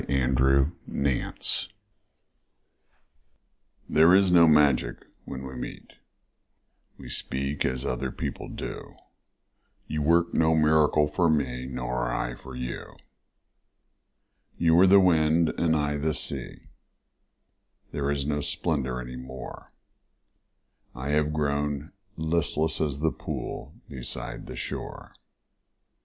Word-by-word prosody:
After 65 +2 +3 0.2
Love 70 -3 -1 2.5
THERE 80 +4 +6
is 95 -1 +4
no 85 -2 +7
magic 70 -6 +3 0.2
when 65 0 -6
we 65 - -7
meet, 60 - -8 1.0
We - - -11
speak 70 +2 -3
as 65 -1 -2
other - - -2
people - - -5
do, - - -7 0.9
You 75 -1 -3
work 85 +3 +3
no 80 0 +3
miracle 75 -1 +4
for 85 +3 +1
me 65 -5 0
Nor - - -2
I - - -2
for 65 +1 -11
you. 60 -1 -6 1.6
You 80 -1 +3
were 90 +3 +7
the 100 +1 +8
wind 80 -2 +4
and 80 -1 +2
I 75 -1 0
the 75 +2 -1
sea - - -5 1.2
There 70 -1 -2
is 70 -1 -1
no 75 0 -1
splendor 70 -6 -1
any 60 0 -7
more, 65 +1 -9 1.2
I 65 +3 -5
have 75 0 +2
grown 75 -1 -1 0.3
listless 80 -1 0
as 75 -2 -1
the 80 0 +2
pool - - -6
Beside 65 -2 -6
the - - -7
shore. - - -6
75 Hz, 115 wpm, -27 LUFS, 65-80 Hz, 2.5 s, the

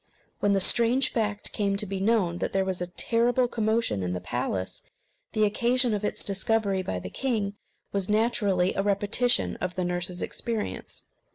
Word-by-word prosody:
When 205 -1 +2
the 195 - +3
strange 240 +6 +3
fact 210 -3 -1
came 200 -1 0
to 210 - +1
be 195 -1 -3
known, 195 -4 +1
there 195 0 0
was 185 -1 -2
a 180 - -2
terrible 240 +6 +1
commotion 220 - 0
in 90 -1 -2
the 90 - -2
palace. 95 +1 -3 0.5
The 215 - +2
occasion 240 +3 +2
of 210 0 -2
its 210 - -2
discovery 200 0 0
by 95 - -3
the 90 0 -6
king 220 -7 -1 0.4
was 195 -1 -2
naturally 205 -4 +2
a - - 0
repetition 205 +5 +1
of 180 0 -3
the 185 - -1
nurse's 175 0 -2
experience. 230 -3 -4
205 Hz, 170 wpm, -27 LUFS, 185-230 Hz, 0.5 s, the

